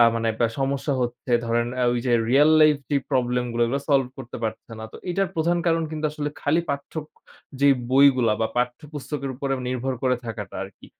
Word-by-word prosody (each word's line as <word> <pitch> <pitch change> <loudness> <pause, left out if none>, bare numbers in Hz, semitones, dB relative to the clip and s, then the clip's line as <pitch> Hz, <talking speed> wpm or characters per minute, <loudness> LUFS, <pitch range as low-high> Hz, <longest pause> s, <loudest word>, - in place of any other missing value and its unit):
আ - - +9
মানে 115 0 0
বা 115 - +5
সমস্যা 135 +1 -1
হচ্ছে 120 +1 -5
ধরেন 115 0 +1
আ - - +2
ওই 120 - 0
যে 120 - +2 0.2
রিয়াল 145 +4 +6
লাইফ 155 -1 +6
যেই 140 -1 +2
প্রবলেম 125 -1 +1
গুলা 120 0 +1
ওইগুলা 140 +4 -1
সলভ 135 -2 +4
করতে 120 -2 -7
পারতেছে 110 +1 -4
না। 110 - -6
তো - - -9
এটার 195 +1 0
প্রধান 170 +2 +1
কারণ 165 -1 +2
কিন্তু 155 0 -5
আসলে 150 -1 -3
খালি 155 +4 +2
পাঠ্যক 145 +2 -5 0.5
যে 140 - +5 0.2
বইগুলা 130 -4 +5
বা 110 - +2
পাঠ্যপুস্তকের 140 +2 -3
উপর 140 +2 -4 0.2
নির্ভর 130 +1 -2
করে 130 -1 +2
থাকাটা 115 - -6
আরকি। - - -11
135 Hz, 195 wpm, -24 LUFS, 120-150 Hz, 0.5 s, আ